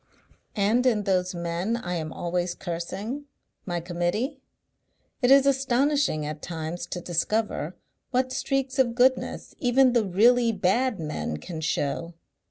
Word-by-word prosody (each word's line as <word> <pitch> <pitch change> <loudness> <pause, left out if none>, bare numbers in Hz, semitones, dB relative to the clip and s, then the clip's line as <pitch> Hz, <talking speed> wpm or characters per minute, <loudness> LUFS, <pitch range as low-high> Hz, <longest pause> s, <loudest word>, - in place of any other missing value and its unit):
And 215 +4 +2
in 215 -4 +2
those 185 -2 0
men 170 +6 -1
I 180 -6 -4
am 160 -2 -3
always 175 0 -2
cursing, 195 +10 -5 0.4
my 175 -1 -1
Committee, 175 - -2 0.8
it 245 - +3
is 275 0 +7
astonishing 270 - +2
at 150 +1 -5
times 165 0 -5
to 175 - -5
discover 175 -1 -1 0.3
what 255 0 0
streaks 270 0 -1
of 240 -3 +3
goodness 260 +1 +1
even 255 0 +4
the 235 -2 +3
really 230 +5 +4
bad 215 +4 +1
men 150 - -3
can 160 - -7
show.... 160 +2 -2
200 Hz, 135 wpm, -26 LUFS, 175-255 Hz, 0.8 s, is